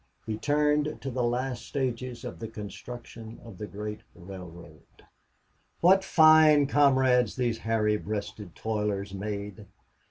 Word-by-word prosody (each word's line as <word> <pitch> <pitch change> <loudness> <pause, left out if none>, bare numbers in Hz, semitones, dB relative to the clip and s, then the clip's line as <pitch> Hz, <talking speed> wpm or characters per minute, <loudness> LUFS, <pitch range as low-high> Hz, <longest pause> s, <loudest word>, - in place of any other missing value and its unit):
He 110 - -3
turned 150 +4 +1
to 135 - -4
the 125 +1 -2
last 120 0 -1
stages 125 -2 -4
of - - -7
the 115 - -5
construction 115 +1 -9
of 110 -6 -12
the 105 - -5
great 105 +1 -6 0.2
railroad. 85 -4 -11 1.0
What 190 +3 +5
fine 155 -4 +6
comrades 130 -4 +3
these 120 -3 -1
hairy 110 -1 +1
breasted 105 -3 -6
toilers 105 -3 -2
made! 100 +1 -6
115 Hz, 125 wpm, -28 LUFS, 105-130 Hz, 1.0 s, fine